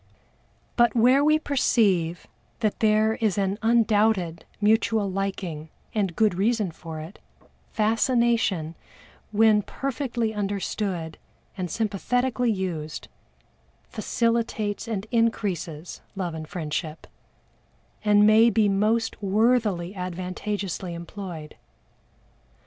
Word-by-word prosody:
But 240 -1 +4
where 250 +4 +5
we 305 +1 +5
perceive 200 - +1 0.4
that 215 -2 0
there 220 0 +3
is 215 -4 +1
an 195 +1 0
undoubted 215 -6 +2
mutual 220 0 +2
liking 185 -5 -4 0.2
and 195 -6 -1
good 215 -3 +3
reason 210 0 +1
for 160 -1 -8
it, 160 +6 -10 0.5
fascination, 225 -6 +1 0.6
when 215 0 +4
perfectly 240 -2 -3
understood 195 -4 -3 0.4
and 185 -3 -4
sympathetically 240 +5 0
used, 170 -6 -4 0.8
facilitates 230 -2 -1
and 210 -3 -3
increases 190 -9 -1
love 180 -4 -3
and 160 -1 -6
friendship, 155 -1 -4 1.0
and 210 -1 +5
may 220 +2 +6
be 215 -1 +3
most 215 +3 +1
worthily 205 -3 +1
and 180 -2 -4
advantageously 185 0 -4
employed. 170 -2 -8
205 Hz, 100 wpm, -25 LUFS, 180-225 Hz, 1.0 s, may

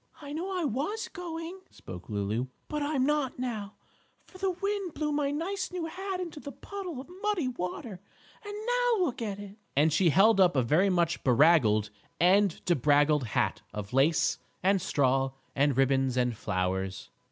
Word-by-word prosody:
"I 285 -1 -8
know 350 +5 -3
I 360 -3 -1
was 295 - -2
going," 345 0 -6
spoke 90 -1 -10
Lulu, 105 +4 -1 0.2
"but 300 0 -3
I'm 285 -3 +1
not 295 -2 0
now, 220 -5 -4 0.5
for 370 - -15
the 385 0 +1
wind 395 -1 -3
blew 300 -1 -1
my 290 -1 0
nice 345 +9 -3
new 360 -2 -3
hat 380 +3 -4
into 335 -4 -5
the 285 - -7
puddle 370 -7 -7
of 265 - -9
muddy 415 -9 0
water, 185 -3 -5 0.4
and 410 -1 -7
now - - +2
look 255 -6 -4
at 205 -3 -3
it!" 205 0 -10 0.2
and 150 +2 +4
she 170 +2 +4
held 195 +6 +5
up 180 -4 +5
a 130 - +3
very 165 +11 +3
much 170 -2 +1
beraggled 120 -6 +4 0.3
and 190 +1 +3
debraggled 145 -3 +3
hat 110 - 0
of 105 0 -6
lace 145 +5 +3 0.2
and 195 0 +3
straw 135 -2 +1 0.2
and 140 -1 +2
ribbons 135 -1 +2
and 125 -2 +1
flowers. 95 -2 -2
200 Hz, 170 wpm, -29 LUFS, -, 0.5 s, held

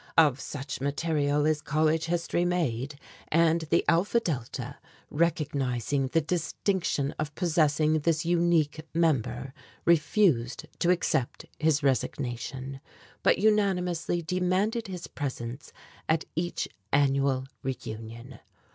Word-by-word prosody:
Of 150 -5 +5
such 140 -2 -6
material 145 0 +1
is 155 -1 +1
college 155 +1 +1
history 170 0 0
made, 145 -6 -1 0.3
and 165 +1 +3
the 170 - +3
Alpha 180 +7 +3
Delta, 140 - -4 0.3
recognizing 140 -5 0
the 165 +5 +2
distinction 170 -2 -1
of 150 -1 -3
possessing 155 -2 +2
this 155 +1 +1
unique 170 -3 +2
member, 135 -5 0 0.3
refused 150 - +3
to 175 - +2
accept 170 -8 0
his 155 -1 +2
resignation, 135 0 -2 0.4
but - - +4
unanimously 180 -5 +1
demanded 185 +7 0
his 180 -3 -6
presence 130 -1 -5 0.4
at 160 +1 +2
each 175 +1 -1 0.2
annual 135 -1 +2 0.2
reunion. 115 -1 -6
155 Hz, 105 wpm, -28 LUFS, 135-170 Hz, 0.4 s, Of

